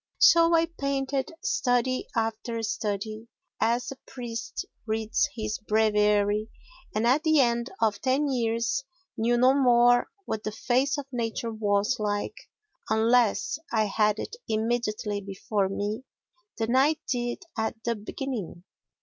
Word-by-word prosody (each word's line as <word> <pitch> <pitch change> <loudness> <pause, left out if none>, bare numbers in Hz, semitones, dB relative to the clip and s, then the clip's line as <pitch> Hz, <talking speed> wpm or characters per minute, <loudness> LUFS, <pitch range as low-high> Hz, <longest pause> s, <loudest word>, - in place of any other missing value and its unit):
So 335 -9 +6
I 330 0 +4
painted 275 -4 -2
study 250 0 +1
after 225 0 -2
study, 215 +1 -3 0.3
as 240 +3 +1
a 270 - -8
priest 235 -3 -5 0.2
reads 220 +6 0
his 215 -2 -3
breviary, 210 0 +2 0.5
and 215 +2 +1
at 260 +5 +4
the 315 -2 +3
end 235 -1 +2
of 215 -2 +1
ten 270 +3 +2
years 235 0 0 0.3
knew 240 +2 +2
no 255 +2 +5
more 245 -2 +5 0.2
what 220 - -3
the 215 - -2
face 260 +6 +1
of 285 - -4
nature 230 -1 -2
was 210 +1 +1
like, 205 - -1 0.6
unless 225 +4 +2
I 220 -2 +2
had 210 +1 +2
it 450 - -5
immediately 215 -2 -1
before 195 0 -2
me, 205 +4 -2 0.6
than 230 +2 0
I 285 +4 +4
did 240 +7 -2
at 220 -2 -1
the 235 - +1
beginning. 210 - -5
230 Hz, 130 wpm, -27 LUFS, 215-255 Hz, 0.6 s, So